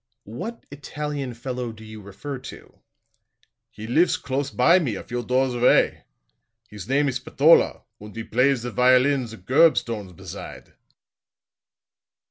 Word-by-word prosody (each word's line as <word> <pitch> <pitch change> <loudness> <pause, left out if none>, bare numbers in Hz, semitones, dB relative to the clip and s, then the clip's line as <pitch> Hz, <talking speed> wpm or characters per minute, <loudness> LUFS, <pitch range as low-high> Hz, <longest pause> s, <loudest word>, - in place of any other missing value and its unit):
"What 180 - -7
Italian 145 -3 -5
fellow 125 0 -5
do 110 0 -13
you 110 0 -10
refer 125 +8 -8
to?" 130 - -12 0.9
"He 110 - -10
lifs 155 +10 +2
close 140 +1 -3
by 170 +9 +4
me, 130 - -2
a - - -7
few 120 0 -5
doors 130 +2 0
away. 120 0 +2 0.6
His 105 0 -10
name 140 +2 +2
is 130 -2 -1
Spatola, 140 +5 +3 0.2
und 105 0 -12
he 115 - -5
plays 125 +2 +1
the 120 - -4
violin 130 +2 +3
the 110 0 -10
gurb 135 - +4
stones 105 -6 -4
beside." - - -10
125 Hz, 140 wpm, -23 LUFS, 115-140 Hz, 0.9 s, by